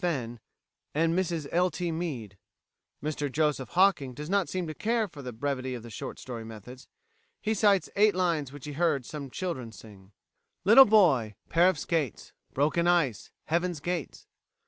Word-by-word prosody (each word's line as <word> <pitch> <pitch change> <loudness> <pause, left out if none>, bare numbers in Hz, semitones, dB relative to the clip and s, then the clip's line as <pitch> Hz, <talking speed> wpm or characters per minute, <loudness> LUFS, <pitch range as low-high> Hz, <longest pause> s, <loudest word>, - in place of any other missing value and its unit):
Fenn, 125 -10 -2 0.6
and 165 +2 +2
Mrs 170 -5 -1
L. 180 +2 +3
T. 175 +1 -3
Meade. 140 - -4 0.7
Mr 150 -2 -2
Joseph 150 -3 0
Hocking 170 -10 +3
does 150 +5 -6
not 200 -3 +2
seem 185 -1 -2
to 155 - -5
care 225 +4 0
for 150 -6 -11
the 125 -2 -6
brevity 130 +1 -3
of 115 -2 -9
short - - -6
story 120 -3 -7
methods. 115 +3 -11 0.5
He 220 - -1
cites 200 -3 +3
eight 210 0 +4
lines 165 -7 0
which 145 -1 -10
he 150 - -5
heard 150 -4 +1
some 145 -1 -7
children 130 -8 -4
sing: 100 -3 -14 0.5
"Little 230 +8 +9
boy, 150 - +4
Pair 175 +3 +5
of 185 - -1
skates, 150 - -2 0.2
Broken 155 +5 +1
ice, 165 - +1 0.2
Heaven's 170 0 -1
gates. 175 -2 -4
155 Hz, 165 wpm, -28 LUFS, 130-180 Hz, 0.7 s, Little